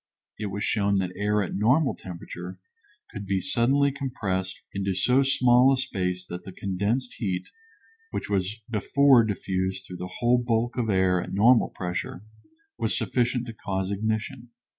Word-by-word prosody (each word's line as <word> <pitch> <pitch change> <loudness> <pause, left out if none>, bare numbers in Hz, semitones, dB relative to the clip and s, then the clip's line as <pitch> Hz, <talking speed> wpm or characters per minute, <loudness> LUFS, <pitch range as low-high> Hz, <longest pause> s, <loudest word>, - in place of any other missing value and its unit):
It 105 - -2
was 100 +1 -4
shown 100 -1 +1
that 90 -1 -1
air 105 +1 +1
at 90 - -5
normal 130 +8 +3
temperature 90 0 -8 0.5
could 100 -2 -7
be 95 -1 +1
suddenly 130 +9 +2
compressed 100 -9 -3
into 100 -1 -1
so 125 +8 +3
small 125 -1 +5
a 135 - +2
space 90 -8 -2
that 90 0 -7
the 95 - -9
condensed 100 +7 -2
heat, 95 -6 -2 0.6
which - - -4
was 100 +2 -2
before 125 +3 +4
diffused 95 -2 -2
through 90 - -8
the 90 +1 -7
whole 120 0 +3
bulk 120 0 0
of 120 -3 -1
air 95 -2 +3
at - - -6
normal 115 +4 +5
pressure, 90 +1 -5 0.6
was 110 - 0
sufficient 120 0 0
to 115 - -7
cause 95 -2 -3
ignition. 110 +4 -3
105 Hz, 160 wpm, -26 LUFS, 95-120 Hz, 0.6 s, small